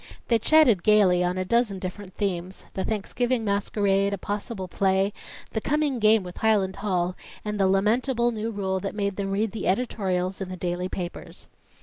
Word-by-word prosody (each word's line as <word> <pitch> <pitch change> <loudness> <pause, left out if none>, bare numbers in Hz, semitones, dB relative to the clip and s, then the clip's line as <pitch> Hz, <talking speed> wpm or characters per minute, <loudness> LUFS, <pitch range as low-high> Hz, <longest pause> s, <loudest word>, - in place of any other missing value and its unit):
They 230 -1 +4
chatted 250 - +5
gaily 190 -3 +4
on 180 +1 0
a 185 - -1
dozen 230 -1 +1
different 185 +1 -7
themes 185 -2 -3
the 190 - -2
Thanksgiving 230 +3 -1
masquerade, 200 -1 +1
a - - -10
possible 205 0 -4
play, 195 +2 +1 0.4
the 220 - -2
coming 290 -2 0
game 215 -1 +5
with 180 -1 -9
Highland 205 -4 +2
Hall, 180 -3 -1 0.3
and 210 -1 -3
the 195 - +4
lamentable 235 +5 +2
new 220 0 -3
rule 190 -3 -2
that 200 +1 -5
made 200 -2 -1
them 195 0 -3
read 205 +2 0
the 220 - -4
editorials 190 -3 -1
in 190 - -4
the 185 - -6
daily 180 +1 -2
papers. 175 -2 -6
200 Hz, 180 wpm, -25 LUFS, 185-220 Hz, 0.4 s, chatted